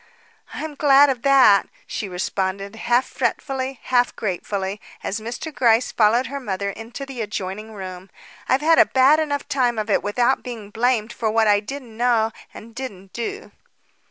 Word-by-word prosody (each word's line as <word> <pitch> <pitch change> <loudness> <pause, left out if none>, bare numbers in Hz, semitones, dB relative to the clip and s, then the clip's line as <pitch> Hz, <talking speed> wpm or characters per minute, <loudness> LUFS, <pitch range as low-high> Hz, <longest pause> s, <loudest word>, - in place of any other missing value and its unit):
"I'm 315 -1 -5
glad 285 -1 +5
of 250 -3 -5
that," 260 -7 +5 0.2
she 205 - -5
responded, 190 +2 -3
half 240 +3 +1
fretfully, 265 -2 -3
half 245 -1 +1
gratefully, 195 0 -3 0.2
as 205 - -2
Mr. 240 +8 -6
Gryce 235 -2 +3
followed 230 +3 +3
her 280 +2 -5
mother 200 -5 -3
into 230 +6 -8
the 265 -3 -6
adjoining 210 +1 -5
room. 185 -1 -8 0.4
"I've 260 +2 +3
had 325 +1 +4
a - - +8
bad 270 +4 +5
enough 290 -2 -2
time 245 -4 +1
of 215 0 -2
it - - +3
without 240 +5 +1
being 225 -5 -8
blamed 230 0 0
for 225 -2 -1
what 220 +1 +3
I 205 -1 +5
didn't 240 +1 -8
know 230 -2 +2 0.2
and 230 +1 -12
didn't 200 -7 -8
do." 395 - -5
230 Hz, 165 wpm, -22 LUFS, 205-265 Hz, 0.4 s, a